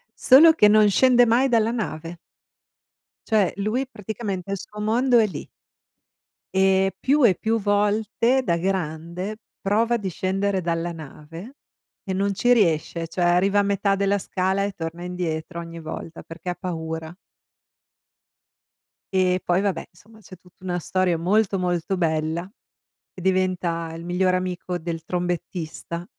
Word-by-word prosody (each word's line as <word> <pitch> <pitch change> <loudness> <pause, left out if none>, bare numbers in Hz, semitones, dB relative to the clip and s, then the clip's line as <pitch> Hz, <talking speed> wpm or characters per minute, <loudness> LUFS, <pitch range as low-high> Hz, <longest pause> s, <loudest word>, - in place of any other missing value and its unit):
solo 315 +5 +7
che 210 -9 +5
non 210 0 +5
scende 245 +3 +5
mai 255 +4 +3
dalla 225 -2 +3
nave. 170 -6 -4 1.1
Cioè, 210 -4 +3
lui 215 +7 -1
praticamente 200 -4 -5
il 200 - -1
suo 210 +3 -10
mondo 240 +4 +2
è 220 - +3
lì. - - -7 1.1
Ehm, 190 0 +3
più 280 +1 +2
e 195 -6 +5
più 225 +5 0
volte, 210 +5 +1
da 170 -5 +1
grande 180 +2 -3 0.2
prova 225 +4 +1
di 195 -4 -4
scendere 190 +2 -1
dalla 170 0 -2
nave 165 - -10 0.5
e 190 - -4
non 200 +1 0
ci 245 +5 +3
riesce, 165 -5 +1
cioè 175 +2 -5
arriva 180 +4 +3
a - - +3
metà 200 0 +1
della 200 +1 +1
scala 190 +1 -1
e 200 - -1
torna 170 -1 -6
indietro 170 -1 -4
ogni 165 0 -8
volta 160 +1 -7
perché 165 +2 -8
ha 175 - -2
paura. 160 -1 -5 2.0
Ehm, 185 -1 +3
poi, 180 +2 +1
vabbè, 200 -2 -2
insomma 220 +1 -20
c'è 195 -3 -13
tutta 180 0 -23
una 175 -1 -1
storia 180 0 0
molto, 195 +3 +1
molto 180 +1 -1
bella 160 +1 -1 0.6
e 185 - -10
diventa 180 -3 0
il 165 - -8
migliore 185 +1 +1
amico 180 -1 -4
del 165 -1 -5
trombettista 175 -1 -4
185 Hz, 145 wpm, -23 LUFS, 170-210 Hz, 2.0 s, solo